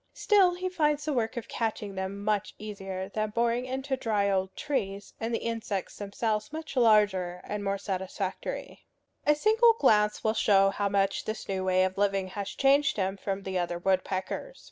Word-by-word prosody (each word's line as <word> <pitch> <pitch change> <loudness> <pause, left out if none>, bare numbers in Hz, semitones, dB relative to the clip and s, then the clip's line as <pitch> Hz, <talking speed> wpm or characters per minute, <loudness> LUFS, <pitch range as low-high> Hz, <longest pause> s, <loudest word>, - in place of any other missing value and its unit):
Still 385 -4 +4
he 365 +1 -3
finds 300 -5 +1
the 305 - 0
work 235 -2 -1
of 235 - -4
catching 220 -3 -3
them 190 +1 -4
much 210 -1 -1
easier 195 -3 -6
than 215 +1 -2
boring 235 +3 0
into 265 +1 -2
dry 210 -5 0
old 190 0 -1
trees, 205 -9 -3
and 225 +1 -2
the 230 - +1
insects 225 -4 -3
themselves 210 +5 -2
much 315 -2 -7
larger 205 -7 +3
and 205 0 -4
more 200 0 0
satisfactory. 190 0 -5 0.4
A 295 - +6
single 445 +8 +5
glance 210 - +3
will 220 - +2
show 195 -3 +4
how 200 0 -1
much 195 0 +1
this 220 +1 -5
new 190 -1 -2
way 185 0 +3
of 185 +1 -2
living 195 -2 +1
has 200 +1 -5
changed 280 0 +3
him 190 -1 0
from 195 0 -4
the 190 -1 -2
other 175 0 -2
woodpeckers. 190 - -2
210 Hz, 180 wpm, -28 LUFS, 195-245 Hz, 0.4 s, A